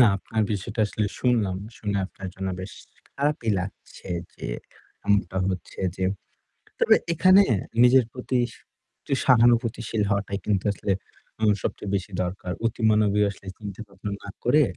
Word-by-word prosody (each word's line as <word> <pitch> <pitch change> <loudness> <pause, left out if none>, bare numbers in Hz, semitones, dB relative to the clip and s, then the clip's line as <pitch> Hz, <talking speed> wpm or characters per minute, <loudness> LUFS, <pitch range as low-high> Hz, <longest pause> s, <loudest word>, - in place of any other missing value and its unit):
না, 125 - +9
আপনার 110 +2 -2
বিষয়টা 105 +2 -2
আসলে 105 +1 -1
শুনলাম। 110 -7 +2 0.2
শুনে 100 -2 -1
আপনার 95 -1 -8
জন্য 95 0 -3
বেশ 95 - -7 0.4
খারাপই 140 -5 -1
লাগছে 95 +1 -9 0.3
যে - - -7 0.6
এমনটা 100 -3 +2
হচ্ছে 95 -2 -5 0.2
যে 95 - -1 0.8
তবে - - +6 0.2
এখানে 185 +4 +7 0.4
নিজের 125 0 +6
প্রতি 130 0 -1
স - - -14 0.5
একটু - - -3
সহানুভূতিশীল 115 -2 +3
হওয়াটাই 100 0 -1
কিন্তু 100 -3 +1
আসলে 100 0 -2 0.5
উ - - -1 0.2
সবচেয়ে 105 - -3
বেশি 95 +1 -3
দরকার। 90 0 -4
অতি 115 +1 -1
মানবে 105 -1 +3
আসলে 100 0 -10
চিন্তা 105 0 -7
ভাবনা 100 +1 -6
না 100 - -7
করে, 145 +5 +5
105 Hz, 145 wpm, -25 LUFS, 100-120 Hz, 0.8 s, না